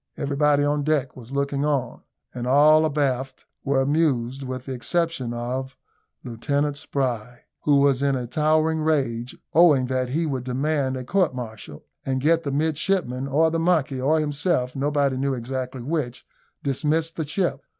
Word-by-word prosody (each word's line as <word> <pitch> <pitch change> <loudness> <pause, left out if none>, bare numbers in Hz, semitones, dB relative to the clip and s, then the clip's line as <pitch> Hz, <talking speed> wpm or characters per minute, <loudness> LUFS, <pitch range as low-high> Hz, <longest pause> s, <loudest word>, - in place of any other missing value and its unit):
Everybody 145 0 +2
on 145 0 +1
deck 145 -3 0
was 125 -1 -12
looking 140 0 -1
on, 140 -5 -1 0.3
and 125 0 -4
all 155 +4 +6
abaft 135 -3 -1 0.2
were 135 -1 +2
amused, 135 -3 +1
with 130 -1 -5
the 135 - -4
exception 165 -1 -1
of 125 +3 -4 0.5
Lieutenant 140 +4 -1
Spry, 125 -5 -3 0.2
who 145 - +4
was 140 -1 +3
in 140 -1 +2
a 125 -1 -3
towering 155 +4 +1
rage, 130 -6 -1 0.2
vowing 155 -6 +5
that 130 -1 -1
he 160 +6 0
would 135 -5 -2
demand 135 +1 -1
a 130 - -5
court 180 0 +1
martial, 110 -11 -8 0.2
and 130 -1 -1
get 160 +4 +3
the 145 -4 -3
midshipmen, 150 -2 0
or 160 +4 +3
the 165 - 0
monkey, 155 -6 +1
or 155 +4 +3
himself 145 -3 0
nobody 140 -1 +1
knew 135 0 0
exactly 130 +1 -5
which 135 -4 -3 0.4
dismissed 155 +4 0
the 160 -3 -3
ship. 180 +3 -1
140 Hz, 160 wpm, -24 LUFS, 130-155 Hz, 0.5 s, all